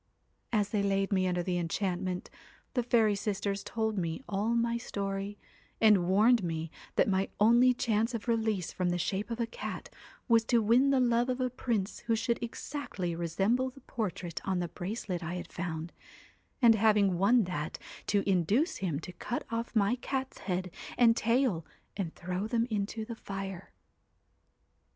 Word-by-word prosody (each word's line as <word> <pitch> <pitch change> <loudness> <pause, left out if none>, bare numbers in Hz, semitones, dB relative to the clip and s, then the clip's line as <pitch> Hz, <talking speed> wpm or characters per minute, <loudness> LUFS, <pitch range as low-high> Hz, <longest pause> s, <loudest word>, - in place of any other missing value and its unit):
' - - -44
As 210 -3 +2
they 210 -1 +1
laid 195 0 +1
me 185 -1 +2
under 180 -1 0
the 180 0 0
enchantment, 180 +1 -2 0.4
the 250 - +2
fairy 230 -3 +3
sisters 200 0 -2
told 220 -2 -1
me 170 +7 -3
all 210 +4 0
my 235 0 +1
story, 200 -3 -3 0.4
and 210 -6 +5
warned 215 +3 +5
me 165 -1 -3 0.2
that - - +4
my 195 -1 +1
only 235 +4 +6
chance 230 -1 0
of 225 - -5
release 220 -6 0
from 180 -1 0
the 175 - 0
shape 190 +5 -2
of 230 0 -4
a 235 - +2
cat 230 - -6 0.4
was 230 -2 +5
to 235 +1 +3
win 235 +5 +4
the 275 -1 +4
love 240 0 +2
of 255 0 -1
a 255 -1 0
prince 225 -5 -2
who 230 - +3
should 230 +1 -1
exactly 230 - -4
resemble 195 +10 +1
the 270 +1 -16
portrait 185 -8 -4
on 190 -1 0
the 175 -1 -2
bracelet 180 0 -4
I 170 +2 -3
had 180 - -7
found, 170 -1 -4 0.7
and 230 -1 +9
having 205 -4 +3
won 225 +5 +5
that, 170 -4 -3 0.3
to 205 -1 +1
induce 200 - +2
him 170 -7 -2
to 180 - -8
cut 240 - -4
off 230 +1 -3
my 215 +3 +3
cat's 265 +1 -3
head 185 -1 -2 0.3
and 230 -2 +6
tail 230 -7 +2 0.3
and 185 -5 -3
throw 185 +3 -3
them 230 0 +1
into 215 +1 -2
the 230 - -6
fire.' 195 -4 -6
205 Hz, 175 wpm, -31 LUFS, 185-235 Hz, 0.7 s, and